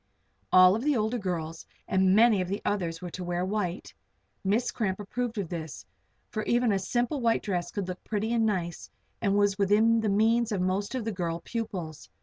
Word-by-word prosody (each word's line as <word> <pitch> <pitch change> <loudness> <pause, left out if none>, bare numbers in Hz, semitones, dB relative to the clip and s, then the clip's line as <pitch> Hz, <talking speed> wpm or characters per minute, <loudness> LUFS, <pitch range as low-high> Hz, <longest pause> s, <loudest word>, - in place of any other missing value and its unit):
All 185 +3 +7
the 285 +2 +1
older 220 +3 0
girls 165 -4 -4 0.2
and 190 0 +3
many 220 -3 +5
of 180 - -2
the 200 +3 -2
others 175 -4 -2
were 175 - -5
to 185 - -6
wear 175 0 -1
white. 190 -3 -3 0.5
Miss 215 +6 +1
Cramp 195 -4 -2
approved 230 +3 -3
of 200 -4 -2
this, 160 -4 -6 0.5
for 215 - -2
even 240 -1 +2
a 195 - +1
simple 245 +7 -1
white 230 -1 +2
dress 175 -4 -3
would 200 -3 -2
look 185 0 -6
pretty 220 +1 -2
and 230 -1 +2
nice 180 -6 -2 0.3
and 200 -2 +2
was 205 0 +2
within 220 +3 +4
the 215 - 0
means 225 +3 +2
of 205 - -1
most 190 +5 -1
of 245 -4 -3
the 225 - -1
girl 170 -4 -3
pupils. 185 -9 -5
200 Hz, 195 wpm, -28 LUFS, 180-225 Hz, 0.5 s, All